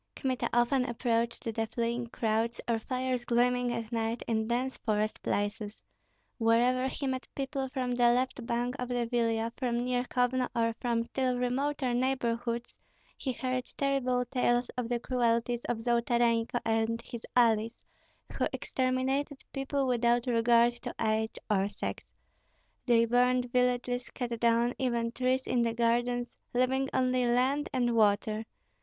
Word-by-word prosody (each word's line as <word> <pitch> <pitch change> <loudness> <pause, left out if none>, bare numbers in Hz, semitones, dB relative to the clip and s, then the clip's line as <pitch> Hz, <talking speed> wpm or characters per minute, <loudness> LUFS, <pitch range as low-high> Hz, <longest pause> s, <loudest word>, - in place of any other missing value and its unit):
Kmita 260 -3 -1
often 240 +2 +3
approached 235 -1 -1
the 225 -1 -2
fleeing 235 +1 -2
crowds, 230 0 -1
or 230 -1 +1
fires 255 +1 -2
gleaming 245 +1 +2
at 230 -1 -4
night 230 0 -1
in 220 -1 0
dense 250 +3 -1
forest 215 -1 -1
places. 205 +1 -2 0.6
Wherever 245 +3 +3
he 275 - -4
met 260 -1 -2
people 270 -1 -3
from 255 -2 -2
the 245 0 +3
left 250 +1 0
bank 240 +2 -1
of 250 0 -3
the 245 -1 0
Vilia, 230 -1 0
from 240 -2 -1
near 250 0 0
Kovno, 250 0 +1
or 230 -1 +1
from 235 -1 +1
still 255 +1 -1
remoter 255 +1 0
neighborhoods, 240 -2 -1 0.4
he 265 - -3
heard 255 0 -2
terrible 255 -3 +1
tales 245 -1 +1
of 245 -2 -4
the 240 -1 0
cruelties 240 -1 0
of 240 - -1
Zolotarenko 235 0 +1
and 225 0 +1
his 235 -2 -7
allies, 230 -1 +3 0.6
who - - +3
exterminated 265 +2 -1
people 275 0 -1
without 240 -1 +2
regard 235 0 +4
to - - -6
age 220 0 0
or 200 -2 +2
sex; 100 - -6 0.8
they 230 -1 +5
burned 250 +1 +2
villages, 250 0 0
cut 240 -2 -4
down 235 +1 +3
even 235 -3 0
trees 255 +1 0
in 245 -1 +1
the 230 -1 0
gardens, 240 +1 0 0.2
leaving 265 +2 +2
only 255 -1 +1
land 260 +5 +1
and 245 -3 +1
water. 215 0 +2
240 Hz, 145 wpm, -30 LUFS, 230-255 Hz, 0.8 s, they